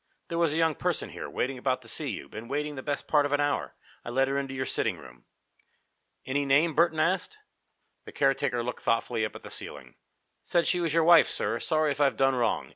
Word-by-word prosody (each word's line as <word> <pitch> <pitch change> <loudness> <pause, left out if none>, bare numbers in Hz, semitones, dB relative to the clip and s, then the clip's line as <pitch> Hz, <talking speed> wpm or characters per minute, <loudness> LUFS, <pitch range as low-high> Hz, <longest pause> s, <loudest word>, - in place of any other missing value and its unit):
"There 170 - -2
was 165 -3 +2
a - - 0
young 165 -1 +3
person - - -2
here, - - -7
waiting 130 0 -2
about 130 0 -1
to - - -10
see 145 +5 -1
you, 105 - -6
been 110 +2 -9
waiting 150 +3 -2
the 135 - -6
best 145 +1 -3
part 150 -2 +4
of 145 - -4
an 145 - +2
hour. 145 0 -1 0.3
I - - -7
let 135 +2 +2
her 140 0 0
into 135 -1 -5
your 130 0 -2
sitting - - -1
room." - - -15 1.0
"Any 140 +2 0
name?" 145 +4 +3
Burton 160 0 +2
asked. 190 - 0 0.7
The - - -9
caretaker 135 -3 +1
looked 125 +1 -5
thoughtfully 115 0 0
up 110 - -7
at - - -10
the - - -9
ceiling. 65 -4 -6 0.5
"Said 170 -1 +1
she 180 - +2
was 170 -2 0
your 165 +1 +3
wife, 170 +1 +7
sir. 115 - -2
Sorry 155 +2 +1
if 140 - -3
I've 140 -2 +3
done 135 0 +3
wrong. 120 -2 0
140 Hz, 230 wpm, -28 LUFS, 130-155 Hz, 1.0 s, wife